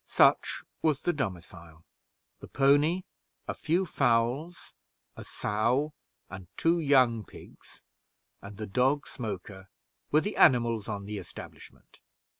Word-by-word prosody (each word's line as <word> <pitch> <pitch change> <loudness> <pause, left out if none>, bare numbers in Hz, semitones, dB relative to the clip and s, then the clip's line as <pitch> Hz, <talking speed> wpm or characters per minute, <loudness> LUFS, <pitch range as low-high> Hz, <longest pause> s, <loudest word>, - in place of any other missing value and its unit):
Such - - +3 0.2
was 155 -3 +1
the 175 - +1
domicile; 85 - -6 0.5
the - - -11
pony, 145 +6 +3 0.4
a - - -2
few 175 +5 0
fowls, 130 +4 0 0.4
a - - -9
sow 120 +8 -1 0.3
and 95 -1 -10
two 170 +1 +2
young 130 -7 +3
pigs, - - -16 0.6
and 100 0 -11
the 110 - -5
dog 130 +8 +1
Smoker, 95 -4 -7 0.4
were 155 - +3
the 205 - -4
animals 120 -7 +4
on 100 -1 -4
the 105 0 -5
establishment. - - -13
120 Hz, 120 wpm, -29 LUFS, 105-150 Hz, 0.6 s, animals